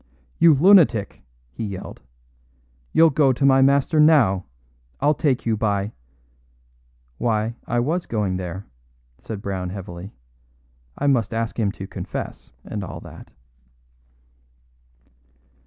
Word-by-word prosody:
"You 165 -2 +6
lunatic," 155 - +4 0.3
he 90 - -6
yelled; 100 -3 -7 0.9
"you'll 165 0 +5
go 140 -1 +3
to 135 +2 0
my 135 -1 +5
master 140 +3 +3
now, 130 - +4 0.5
if - - -12
I 150 +1 +4
take 140 -4 0
you 115 -1 +1
by 105 -1 -1 0.6
" - - -38
"Why, 110 -1 0
I 120 - 0
was 165 +8 -1
going 100 -5 -1
there," 90 +1 -6 0.5
said 105 -3 -7
Brown 95 -2 -3
heavily; 90 0 -8 0.9
"I - - -2
must 120 -6 +1
ask 115 +1 -3
him 105 -3 +1
to 95 - -8
confess, - - -7
and 105 -2 -5
all 90 - -7
that." - - -13
110 Hz, 125 wpm, -22 LUFS, 95-140 Hz, 0.9 s, You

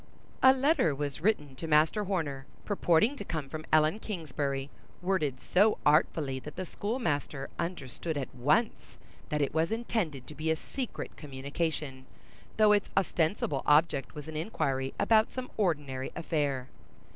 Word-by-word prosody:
A 260 - +9
letter 265 - +2
was 145 0 -3
written 150 -9 +1
to 165 - -5
Master 155 +7 +3
Horner, 145 -8 -2 0.2
purporting 205 - +3
to 205 - -5
come 155 -7 -4
from 155 +1 -6
Ellen 155 +6 +4
Kingsbury, 145 -8 -3 0.3
worded 165 -8 0
so 205 +9 +3
artfully 150 -3 +3
that 150 +3 -9
the 185 - -4
schoolmaster 165 - -2
understood 160 -2 -3
at 135 - -4
once 150 - 0 0.3
that 150 -3 +1
it 140 - -2
was 160 +3 +1
intended 215 - -2
to - - -9
be 155 +2 -3
a 160 - +3
secret 250 - -6
communication, 140 -1 -4 0.5
though 215 -1 +6
its 205 -1 +3
ostensible 160 -5 +1
object 150 -2 +3
was 150 0 -7
an 160 - -7
inquiry 135 -6 -1
about 220 -1 +4
some 255 -1 -5
ordinary 145 -9 -1
affair. 145 -6 -1
155 Hz, 145 wpm, -30 LUFS, 140-195 Hz, 0.5 s, A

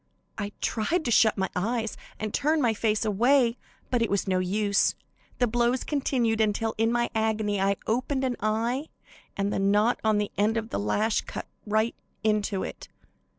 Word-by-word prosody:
I 205 -1 -4
tried 310 +10 0
to 240 - 0
shut 220 -1 +4
my 190 -1 -1
eyes 225 +4 -1 0.2
and 215 0 -3
turn 305 +2 +2
my 240 -5 +2
face 215 0 0
away, 240 +3 +3 0.3
but 245 -2 +2
it 230 - +1
was 200 0 0
no 185 -1 +2
use, 200 +2 +1 0.4
the 245 - +3
blows 240 +2 +1
continued 245 -6 0
until, 220 +1 +1
in 225 +1 +3
my 240 0 0
agony, 220 -2 0
I 195 0 +2
opened 255 +4 0
an 255 -2 0
eye, 230 +7 0 0.5
and 200 +1 0
the - - 0
knot 205 +4 +3
on 215 -1 +3
the 210 -1 -1
end 215 +2 +2
of 225 0 -3
the - - -2
lash 205 - +1
cut - - -7 0.2
right 215 +2 +1 0.3
into 210 -2 +1
it. - - -7
220 Hz, 180 wpm, -27 LUFS, 205-240 Hz, 0.5 s, shut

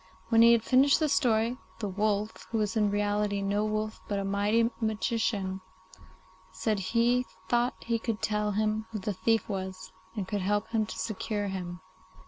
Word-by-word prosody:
When 225 -1 +5
he 235 0 +8
had 230 -1 +2
finished 270 +4 +5
his 310 -3 +1
story, 230 0 +2 0.2
the 215 - -3
wolf, 210 +2 -1
who 230 - -1
was 215 0 0
in 210 -2 +3
reality 205 0 0
no 200 +1 +1
wolf 215 0 -2
but 205 - -1
a 200 - -2
mighty 205 +4 +2
magician, 215 -3 -1 0.9
said 215 -3 -1
he 235 +6 +2 0.2
thought 240 +3 +2
he 230 0 0
could 225 -1 -2
tell 210 -1 0
him 215 +1 0
who 220 - -4
the 205 +1 -2
thief 225 +4 +1
was, 190 -2 -5 0.2
and 195 -3 -3
could 205 -1 -2
help 205 +2 0
him 220 -2 0
to - - -7
secure 210 -1 -2
him. 180 -2 -5
215 Hz, 175 wpm, -29 LUFS, 200-225 Hz, 0.9 s, he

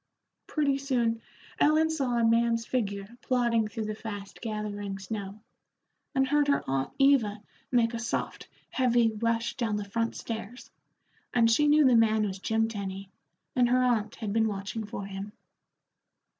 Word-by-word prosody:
Pretty 280 -3 +1
soon 240 -5 0 0.4
Ellen 310 +2 +4
saw 265 -6 0
a 235 - +2
man's 230 0 +2
figure 200 -6 -2
plodding 235 -3 +1
through 215 +1 -4
the 215 - -3
fast 205 -2 -8
gathering 210 -3 -4
snow, 200 +1 -6 0.8
and 265 0 +3
heard 295 +1 +2
her 280 - +2
aunt 135 0 -1
Eva 265 -7 +4 0.3
make 235 -2 +3
a 230 - -3
soft, 230 - -3 0.2
heavy 240 -3 +3
rush 230 +2 -1
down 225 -4 0
the 205 -1 -3
front 230 +3 -2
stairs, 225 +1 -7 0.6
and 230 -1 +5
she 295 +6 +4
knew 300 0 +5
the 255 -2 +6
man 220 -1 +4
was 195 -1 -4
Jim 225 +3 +1
Tenny, 195 -3 -6 0.4
and 245 -1 +4
her 255 +1 +3
aunt 230 -3 +1
had 210 -3 -4
been 225 0 +3
watching 205 +1 -4
for 200 -1 -6
him. 195 +1 -7
225 Hz, 155 wpm, -28 LUFS, 210-245 Hz, 0.8 s, the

